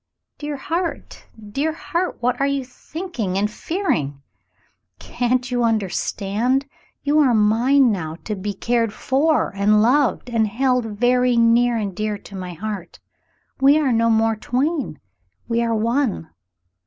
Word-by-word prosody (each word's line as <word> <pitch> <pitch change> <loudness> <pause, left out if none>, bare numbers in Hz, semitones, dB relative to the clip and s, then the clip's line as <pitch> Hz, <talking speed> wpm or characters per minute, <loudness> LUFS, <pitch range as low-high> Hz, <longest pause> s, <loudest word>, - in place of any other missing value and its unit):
"Dear 295 -1 -4
heart, 335 +5 -4 0.2
dear 300 +7 -1
heart! 340 +2 -3
What 250 +1 0
are 275 - +3
you 280 -2 -1
thinking 255 - -5
and 210 +2 0
fearing? 230 - -2 0.7
Can't 250 +1 -1
you 245 -1 +1
understand? 220 +3 0 0.4
You 295 +2 +3
are 260 -6 +4
mine 235 +5 +4
now, 160 -6 -3
to 215 - -3
be 200 +1 -4
cared 230 +1 0
for 295 +1 +1
and 210 +2 +3
loved 250 +4 +2
and 225 -2 +2
held 250 +2 +1
very 245 +3 +2
near 235 +1 +4
and 200 -4 -3
dear 215 0 -2
to 200 - -13
my 180 -2 -6
heart. 195 0 -6 0.6
We 275 +2 +6
are 290 -4 +2
no 230 0 +3
more 225 0 +3
twain, 265 - -2 0.5
we 235 0 +1
are 230 -1 0
one." 230 - 0
235 Hz, 140 wpm, -21 LUFS, 210-275 Hz, 0.7 s, We